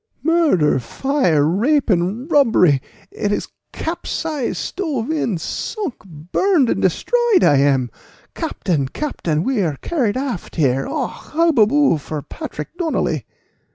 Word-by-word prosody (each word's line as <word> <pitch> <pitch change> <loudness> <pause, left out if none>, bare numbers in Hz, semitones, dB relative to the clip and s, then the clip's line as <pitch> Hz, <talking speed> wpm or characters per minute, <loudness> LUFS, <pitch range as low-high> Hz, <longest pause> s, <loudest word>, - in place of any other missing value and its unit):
"Murder, 305 - +3
fire, 170 - +1
rape, 245 - +2
and 205 - 0
robbery! 220 - +4 0.3
it 205 - -2
is - - -2 0.2
capsized, 320 -4 -3
stove 310 - -3
in, 235 - 0
sunk, 340 - -4
burned, 215 - +1
and - - -1
destroyed 475 -6 +2
I 145 - +5
am! 135 -3 +2 0.4
Captain, 150 -7 -2
captain, 165 - -2
we 260 -3 0
are 155 -6 -1
carried 255 -10 0
aft 260 -9 -4
here 135 -4 +1
Och, - - -2 0.2
hubbaboo 290 - +4
for 150 0 -6
Patrick 150 - -7
Donnally!" 330 -3 -1
225 Hz, 120 wpm, -19 LUFS, -, 0.4 s, I